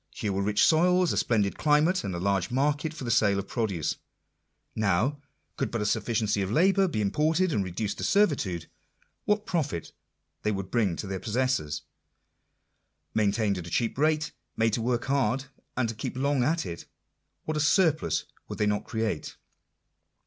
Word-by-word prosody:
Here 105 -2 -3
were 95 - 0
rich 105 +1 +3
soils, 180 +2 +4
a - - -2
splendid 105 -4 +1
climate, 155 +5 +3
and 95 -3 -3
a - - -3
large 95 0 0
market 145 +4 0
for 155 -4 -8
the 120 - -1
sale 105 -3 +3
of 100 0 -3
produce. 100 - -1 0.8
Now, 110 +8 +1 0.4
could 135 - -1
but 115 - -2
a 105 - -1
sufficiency 105 -1 0
of 95 - -1
labourers 190 - +3
be 110 -10 -1
im 100 - 0
ported 160 - +2
and 100 - +1
reduced 95 +3 -3
to - - -3
servitude, 140 - +2 0.6
what 210 0 +1
profit 145 - -2 0.5
they 105 - 0
would 95 -2 -4
bring 105 -8 +1
to 105 - -5
their 95 -1 -4
possessors! 120 - -1 1.3
Maintained 105 -2 +1
at 85 - -7
a - - -6
cheap 115 +7 0
rate; 155 +2 +1 0.3
made 115 -1 +2
to 115 - 0
work 120 +1 0
hard, 135 -1 +1 0.3
and 130 -2 +2
to 115 - -3
keep 115 +3 -5
long 140 -1 +1
at 160 +5 +1
it, 85 -1 -7 0.6
what 155 - -2
a - - 0
surplus 150 - +2 0.2
would - - -6
they 105 - +1
not 105 0 0
create 110 -8 -3
115 Hz, 180 wpm, -28 LUFS, 100-150 Hz, 1.3 s, soils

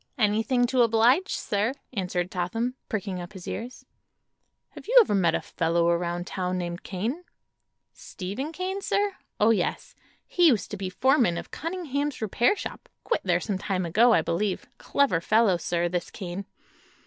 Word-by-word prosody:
"Anything 225 +3 +2
to 255 +1 +2
oblige, 235 - +3
sir," 210 +5 -1 0.2
answered 180 -3 -2
Totham, 225 +8 -2 0.2
pricking 195 -4 -3
up 175 +4 -9
his 190 -3 -10
ears. 240 +5 -6 0.8
"Have - - -13
you - - +4
ever 440 - +4
met 175 -5 +3
a - - -1
fellow 170 +1 +1
around 175 0 -1
town 185 -1 -2
named 175 0 -4
Kane?" 225 - -3 0.7
"Steve 190 +4 -7
Kane, 375 +3 -3
sir? 405 0 0 0.2
Oh, 215 +2 +5
yes. 220 - -1 0.3
He 350 -1 +4
used 235 -9 +2
to - - -3
be 190 -1 -3
foreman 245 - +3
of - - -7
Cunningham's 295 -4 -3
repair 230 - +2
shop. - - -7
Quit - - 0
there - - +2
some 200 -3 -3
time 185 -3 -1
ago, 220 +9 +4
I - - +4
believe. 185 +3 -1
Clever 270 -13 +1
fellow, 215 -1 +3
sir, 170 +1 -1
this 175 0 -3
Kane." 190 0 -6
210 Hz, 160 wpm, -26 LUFS, 180-255 Hz, 0.8 s, Oh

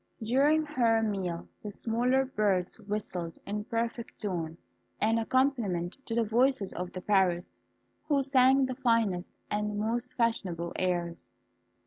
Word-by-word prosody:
During 285 +7 +3
her 235 -6 +2
meal 190 -5 -2
the 210 - -5
smaller 245 +5 +1
birds 200 -7 0
whistled, 185 -5 -4
in 210 +1 -3
perfect 230 0 -3
tune, 170 -6 -3 0.4
an 225 +2 +2
accompaniment 225 -8 +1
to 230 - -2
the 235 - +3
voices 230 -1 +2
of 180 0 -4
the 185 - -6
parrots, 185 -3 +1 0.5
who 280 -3 +2
sang 265 0 +5
the 260 - -3
finest 230 -8 +1 0.2
and 210 0 -1
most 225 +3 -1
fashionable 185 -8 0
airs. 175 -2 -2
215 Hz, 130 wpm, -30 LUFS, 185-245 Hz, 0.5 s, sang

